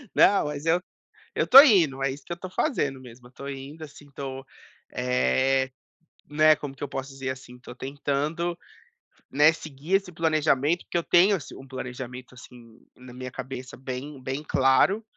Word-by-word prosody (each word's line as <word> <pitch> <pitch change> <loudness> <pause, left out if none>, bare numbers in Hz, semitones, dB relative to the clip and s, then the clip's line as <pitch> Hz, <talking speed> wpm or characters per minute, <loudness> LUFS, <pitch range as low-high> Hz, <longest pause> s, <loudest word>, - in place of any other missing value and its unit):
Não, 200 - +5
mas 150 0 -5
eu 170 +2 +2 0.5
eu - - +1
tô 270 +2 +11
indo, 170 - +4
é 135 - +1
isso 140 +2 -9
que - - -12
eu 170 - -4
tô 185 - -7
fazendo 145 - -1
mesmo. 125 -1 -14
Eu - - -21
tô 140 +2 -9
indo, 140 +3 -8
assim, 145 -1 -13
tô, 135 -1 -7 0.5
eh, 65 - +1 0.6
né 155 +1 +5
como 140 -2 -7
que 135 - -14
eu 145 - -3
posso 135 0 -5
dizer, 135 -1 -5
assim, 130 -1 -9
tô 125 - -11
tentando, 145 +6 -2 0.7
né, 150 +4 +5
seguir 155 +3 -5
esse 195 -2 +1
planejamento, 155 -1 +1
porque - - -2
eu - - -1
tenho 190 +4 +5
ass 150 - -10
um 135 - -11
planejamento, 125 -1 -8
assim, 120 -2 -15 0.2
na 125 -1 -14
minha 125 0 -7
cabeça 130 0 -7
bem 130 +2 -7
bem 135 +3 -4
claro, 140 +11 +3
135 Hz, 180 wpm, -26 LUFS, 130-155 Hz, 0.7 s, tô